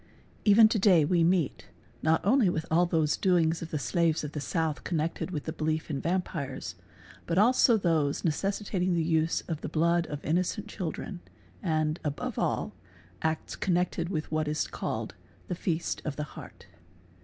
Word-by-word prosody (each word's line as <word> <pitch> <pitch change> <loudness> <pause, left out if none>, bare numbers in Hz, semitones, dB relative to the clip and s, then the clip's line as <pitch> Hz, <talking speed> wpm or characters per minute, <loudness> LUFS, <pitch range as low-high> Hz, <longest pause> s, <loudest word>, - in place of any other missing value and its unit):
Hven 215 +2 +8
to 220 - +1
day 185 -6 +5
we 170 +2 +3
meet, 170 -4 +1 0.3
not 160 +2 +2
only 230 -1 +4 0.2
all 175 +2 +4
those 160 -3 +2
doings 170 -3 +2
of 165 - -6
the 155 - -2
slaves 160 +6 +1
of 150 - -4
jhe 150 - -4
south 160 0 -1
connected 165 +1 -2
with 155 -6 -4
the 160 - -4
belief 155 +1 -2
in 135 -2 -2
vampires 165 -6 -3
©, - - -26 0.5
but 170 - 0
also 235 +2 +5
those 160 -7 +1
neces 195 +5 -1
piating 180 -2 0
the 165 - +1
use 160 0 +1
of 160 -3 -5
the - - -4
blood 170 +2 +2
of 150 -1 -6
innocent 185 +6 0
children, 185 -1 -5 0.4
and, 155 -2 0
above 145 -2 -3
all, - - -1 0.5
acts 160 0 -2
connected 175 -2 0
with 155 -5 -3
what 155 -1 0
is 150 +1 0
called - - -4 0.3
the - - -2
"feast 170 -1 -2
of 150 -3 -3
the 150 - -3
heart. - - -11
165 Hz, 175 wpm, -29 LUFS, 155-180 Hz, 0.5 s, Hven